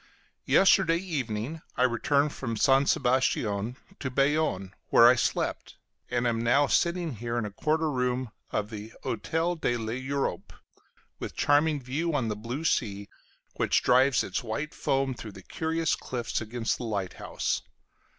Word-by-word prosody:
Yesterday 190 -3 +5
evening 145 - -3 0.2
I 125 - +3
returned 140 +4 +2
from 115 -4 -4
St. 135 +4 +4
Sebastian 120 -3 +1 0.2
to 130 - -3
Bayonne, 135 -8 +1 0.2
where 115 - +8
I 120 - +8
slept, 125 - -1 0.3
and 120 0 0
am 115 -1 +1
now 135 +5 +4
sitting 170 -3 0
here 120 +2 -3
in 115 - -1
a 105 - -5
corner 155 +8 0
room 125 -2 -1 0.2
of 105 +1 -2
the 110 +1 -8
Hotel 165 +10 -1
de 120 -7 0
l'Europe, 130 +5 -3 0.7
with - - -6
charming 145 +1 +3
view 145 +6 -2
on 125 -6 0
the 105 - -2
blue 120 +8 -5
sea, 100 -9 -1 0.5
which - - +2
drives 130 +1 +4
its - - -3
white 145 +7 -4
foam 135 -1 0
through 110 -4 -9
the 95 - -12
curious 160 - -1
cliffs 120 -2 -3
against 115 +1 -2
the - - -5
lighthouse. 100 -5 -2
125 Hz, 150 wpm, -28 LUFS, 115-150 Hz, 0.7 s, where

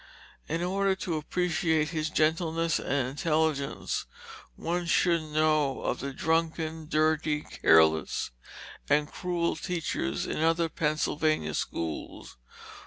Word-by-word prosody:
In 165 +2 -1
order 195 +1 +1
to 175 -4 -3
appreciate 160 -1 0
his 155 -1 -2
gentleness 165 +1 +1
and 130 -2 -1
intelligence, 150 0 -1 0.5
one 175 +1 -2
should 170 -1 +3
know 155 -2 +1
of - - -1
the 140 - -4
drunken, 160 +1 -1
dirty, 155 -1 +1
careless, 80 - +3 0.6
and 150 +1 +2
cruel 175 -1 -1
teachers 160 - -2
in - - -3
other 165 +1 +2
Pennsylvania 155 - 0
schools. 80 +2 -4
155 Hz, 105 wpm, -28 LUFS, 150-165 Hz, 0.6 s, should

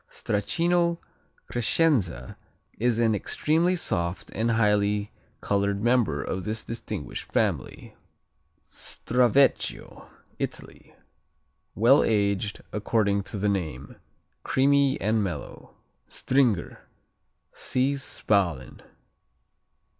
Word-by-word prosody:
Stracchino 170 - 0 0.5
Crescenza 110 - 0 0.4
is 120 0 +2
an 115 -1 +3
extremely 160 - +1
soft 85 - -2
and 115 +1 0
highly 105 -2 +1 0.3
colored 100 0 0
member 120 - +2
of 95 0 -4
this 110 +3 -3
distinguished 115 0 -6
family. - - -2 0.7
Stravecchio 125 +2 0 0.3
Italy - - -6 0.8
Well 120 +7 +5
aged, 100 -1 0
according 105 -1 +1
to 105 - -6
the 100 +1 0
name. 80 -9 -4 0.4
Creamy 140 0 +2
and 110 +1 +1
mellow. 85 -7 -7 0.3
Stringer 125 -9 0 0.6
see 130 +2 0
Spalen. 100 - -1
110 Hz, 85 wpm, -26 LUFS, 100-130 Hz, 0.8 s, Well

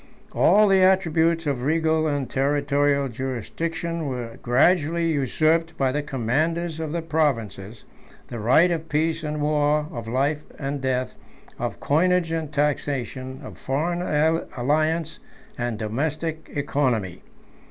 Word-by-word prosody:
All 210 +1 +5
the 195 -1 +4
attributes 170 -3 +3
of 140 -4 -1
regal 160 +2 +1
and 145 -3 -1
territorial 140 0 +1
jurisdiction 160 +7 -4
were 120 -3 -5
gradually 165 +6 +2
usurped 155 +4 +1
by 135 -1 +1
the 150 +2 -1
commanders 150 +5 -1
of 160 -2 -3
the 170 0 -2
provinces; 115 - -1 0.4
the 120 - -7
right 130 +11 +4
of 165 -1 -3
peace 160 +2 0
and 150 0 -3
war, 150 0 +2
of 115 -1 -6
life 140 +5 0 0.2
and 140 -1 -3
death, 130 -1 -1 0.5
of - - -3
coinage 170 +2 +2
and 160 -2 -3
taxation, 135 -3 -2
of - - -10
foreign 165 +6 -1 0.6
alliance 155 +5 0 0.4
and 120 -2 -3
domestic 155 +8 -3
economy. 130 - -1
150 Hz, 125 wpm, -24 LUFS, 130-165 Hz, 0.6 s, All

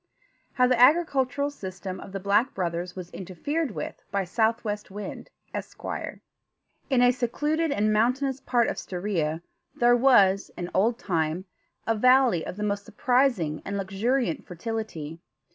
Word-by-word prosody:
HOW 250 - +4
THE 250 -1 +2
AGRICULTURAL 285 -2 +3
SYSTEM 190 -6 -7
OF - - -10
THE 195 - -4
BLACK 205 +7 +2
BROTHERS 175 -1 -3
WAS 180 -2 -8
INTERFERED 270 - -3
WITH 210 - -6
BY 200 -1 0
SOUTHWEST 215 +1 -1
WIND, 205 +2 -7 0.2
ESQUIRE - - -5 0.7
In 255 -3 +4
a 245 - +6
secluded 295 +6 0
and 215 -4 +2
mountainous 255 +5 +1
part 240 -2 +2
of - - -2
Stiria 175 -4 -2 0.3
there 240 0 +5
was, 205 -7 +4
in 175 0 -5
old 225 +5 +2
time, 165 -2 -1 0.4
a 225 - +2
valley 250 -5 +4
of - - -6
the 210 - -3
most 205 -1 -1
surprising 225 - +1
and 200 0 -3
luxuriant 195 +2 0
fertility. 175 -5 -5
210 Hz, 145 wpm, -26 LUFS, 185-250 Hz, 0.7 s, a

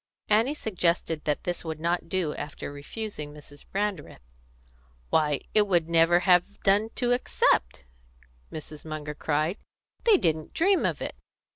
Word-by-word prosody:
Annie 225 +7 +3
suggested 170 - -1
that 150 -1 0
this 175 0 -2
would 160 -2 -5
not 170 +1 -1
do 175 -5 0
after 145 0 -6
refusing 150 +2 -5
Mrs. 145 -1 -11
Brandreth. 195 - -3 0.9
"Why, 150 -3 +2
it 210 -1 +5
would 175 -4 +2
never 170 +1 +4
have 180 +2 +2
done 205 +3 +3
to 245 -1 0
accept!" 60 - +1 0.7
Mrs. 155 -1 -8
Munger 155 -1 -5
cried. 155 +5 -1 0.5
"They 445 -4 +7
didn't 155 - -1
dream 380 +3 +3
of - - -3
it!" - - -4
170 Hz, 140 wpm, -27 LUFS, 150-205 Hz, 0.9 s, They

